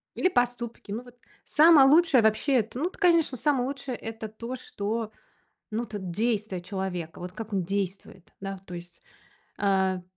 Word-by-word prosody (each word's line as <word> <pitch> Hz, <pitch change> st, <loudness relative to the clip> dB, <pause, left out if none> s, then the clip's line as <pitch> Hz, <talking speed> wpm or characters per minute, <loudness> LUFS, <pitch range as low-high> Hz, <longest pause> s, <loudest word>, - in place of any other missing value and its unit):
Или 370 Hz, -, +3 dB
поступки. 245 Hz, -, -1 dB
Ну, 230 Hz, +4 st, -3 dB
вот 245 Hz, 0 st, -16 dB, 0.3 s
самое 300 Hz, -3 st, +7 dB
лучшее 305 Hz, -5 st, +6 dB
вообще, 220 Hz, +6 st, +2 dB
это, 235 Hz, +1 st, 0 dB
ну, 320 Hz, -, 0 dB
эт -, -, -17 dB
конечно, 335 Hz, -7 st, +3 dB
самое 265 Hz, -2 st, +1 dB
лучшее- 275 Hz, -2 st, -4 dB
это 225 Hz, -1 st, -6 dB
то, 230 Hz, +4 st, -6 dB
что, 220 Hz, -1 st, -3 dB, 0.6 s
ну, 230 Hz, +3 st, -1 dB
тут 200 Hz, -5 st, -6 dB
действия 210 Hz, -3 st, -1 dB
человека, 180 Hz, -3 st, -4 dB
вот 180 Hz, +1 st, -7 dB
как 220 Hz, -1 st, -7 dB
он 190 Hz, -2 st, +1 dB
действует. 190 Hz, -1 st, -4 dB
Да, 195 Hz, -1 st, -5 dB
то 180 Hz, -, -10 dB
есть. 175 Hz, 0 st, -10 dB, 0.6 s
А, 190 Hz, -2 st, +1 dB
220 Hz, 165 wpm, -27 LUFS, 195-255 Hz, 0.6 s, самое